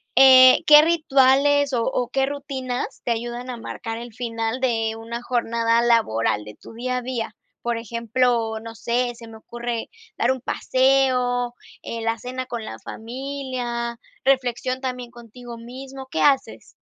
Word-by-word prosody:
eh, 260 Hz, -1 st, +8 dB
¿qué 300 Hz, 0 st, +10 dB
rituales 285 Hz, -3 st, +3 dB
o 235 Hz, -2 st, +1 dB
o 245 Hz, -1 st, -1 dB
qué 270 Hz, +1 st, +1 dB
rutinas 270 Hz, -3 st, -4 dB
te 240 Hz, -, 0 dB
ayudan 240 Hz, +2 st, -4 dB
a 245 Hz, -, -6 dB
marcar 225 Hz, 0 st, -6 dB
el 240 Hz, -1 st, -9 dB
final 230 Hz, 0 st, -3 dB
de 225 Hz, -3 st, 0 dB
una 230 Hz, +1 st, -6 dB
jornada 230 Hz, -1 st, +1 dB
laboral 115 Hz, -, +2 dB
de 105 Hz, 0 st, -10 dB
tu -, -, -14 dB
día 250 Hz, +2 st, -2 dB
a -, -, -2 dB
día? 235 Hz, -4 st, -4 dB, 0.3 s
Por 235 Hz, -1 st, -1 dB
ejemplo, 230 Hz, 0 st, 0 dB
no 230 Hz, 0 st, -9 dB
sé, 240 Hz, +3 st, -1 dB
se 230 Hz, 0 st, -12 dB
me 225 Hz, 0 st, -11 dB
ocurre 235 Hz, +1 st, -5 dB, 0.3 s
dar -, -, +2 dB
un 260 Hz, -, -2 dB
paseo, 255 Hz, -2 st, +1 dB, 0.3 s
eh, 230 Hz, -, -5 dB
la 225 Hz, 0 st, -1 dB
cena 255 Hz, +2 st, -5 dB
con 235 Hz, -3 st, -5 dB
la 110 Hz, -, -7 dB
familia, 245 Hz, -, -5 dB, 0.3 s
reflexión 255 Hz, -1 st, +1 dB
también 250 Hz, -2 st, -4 dB
contigo 240 Hz, 0 st, -11 dB
mismo, 265 Hz, +3 st, -9 dB
¿qué -, -, -1 dB
haces? 275 Hz, -2 st, +1 dB
245 Hz, 155 wpm, -23 LUFS, 230-260 Hz, 0.3 s, qué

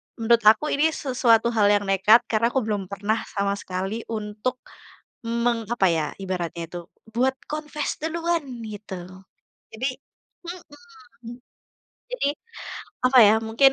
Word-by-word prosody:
menurut 230 Hz, -1 st, +3 dB
aku 220 Hz, +8 st, +5 dB
ini 300 Hz, +3 st, +3 dB
sesuatu 235 Hz, -4 st, +2 dB
hal 215 Hz, -3 st, +3 dB
yang 205 Hz, 0 st, +3 dB
nekat 195 Hz, +4 st, +5 dB
karena 220 Hz, +1 st, +3 dB
aku 255 Hz, +1 st, 0 dB
belum 205 Hz, -3 st, -2 dB
pernah 205 Hz, +3 st, -1 dB, 0.2 s
sama 200 Hz, 0 st, +1 dB
sekali 190 Hz, +4 st, -4 dB
untuk, 215 Hz, +3 st, -3 dB, 0.7 s
meng 235 Hz, -1 st, 0 dB
apa 195 Hz, -5 st, +3 dB
ya, 160 Hz, -2 st, +1 dB, 0.2 s
ibaratnya 175 Hz, -3 st, -3 dB
itu, 175 Hz, -, -5 dB, 0.3 s
buat 255 Hz, +4 st, +1 dB, 0.2 s
confess 300 Hz, -1 st, -3 dB
duluan, 330 Hz, 0 st, -1 dB, 0.2 s
gitu. 210 Hz, -2 st, -7 dB, 0.8 s
Jadi 250 Hz, +5 st, -2 dB, 0.6 s
mhm, 320 Hz, -, -12 dB, 0.8 s
jadi, 475 Hz, -, 0 dB, 0.8 s
apa 255 Hz, 0 st, +5 dB
ya, 210 Hz, -, +6 dB
mungkin 250 Hz, +5 st, +5 dB
230 Hz, 125 wpm, -24 LUFS, 205-265 Hz, 0.8 s, ya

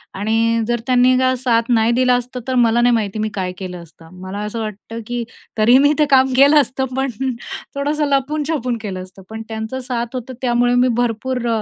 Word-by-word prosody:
आणि 225 Hz, +3 st, +1 dB
जर 240 Hz, 0 st, 0 dB
त्यांनी 255 Hz, 0 st, +4 dB
का 260 Hz, 0 st, +2 dB
साथ 235 Hz, -2 st, +1 dB
नाही 230 Hz, -1 st, +3 dB
दिली 250 Hz, +1 st, +2 dB
असती, 250 Hz, 0 st, -1 dB
तर 260 Hz, -, -1 dB
मला 235 Hz, -1 st, +3 dB
नाही 245 Hz, 0 st, +4 dB
माहिती 215 Hz, -2 st, -2 dB
मी 215 Hz, 0 st, -1 dB
काय 185 Hz, -2 st, -3 dB
केलं 180 Hz, -2 st, -7 dB
असतं. 165 Hz, 0 st, -18 dB
मला 190 Hz, +2 st, -6 dB
असं 210 Hz, +2 st, -5 dB
वाटतं 220 Hz, +1 st, -6 dB
की 240 Hz, 0 st, -3 dB, 0.3 s
तरी 225 Hz, +4 st, +5 dB
मी 285 Hz, +2 st, +4 dB
ते 300 Hz, -, +5 dB
काम 265 Hz, -1 st, +4 dB
केलं 285 Hz, +3 st, +6 dB
असतं, 265 Hz, 0 st, -2 dB
पण 270 Hz, +1 st, 0 dB, 0.7 s
थोडंसं 295 Hz, +2 st, 0 dB
लपून-छपून 280 Hz, -2 st, -1 dB
केलं 190 Hz, -4 st, -5 dB
असतं. 185 Hz, +1 st, -15 dB
पण 220 Hz, 0 st, -7 dB
त्यांच 220 Hz, +1 st, -5 dB
साथ 240 Hz, -1 st, -3 dB
होती, 255 Hz, +1 st, -6 dB
त्यामुळे 245 Hz, -1 st, +2 dB
मी 250 Hz, +1 st, +4 dB
भरपूर 245 Hz, +1 st, -2 dB
240 Hz, 195 wpm, -19 LUFS, 220-260 Hz, 0.7 s, केलं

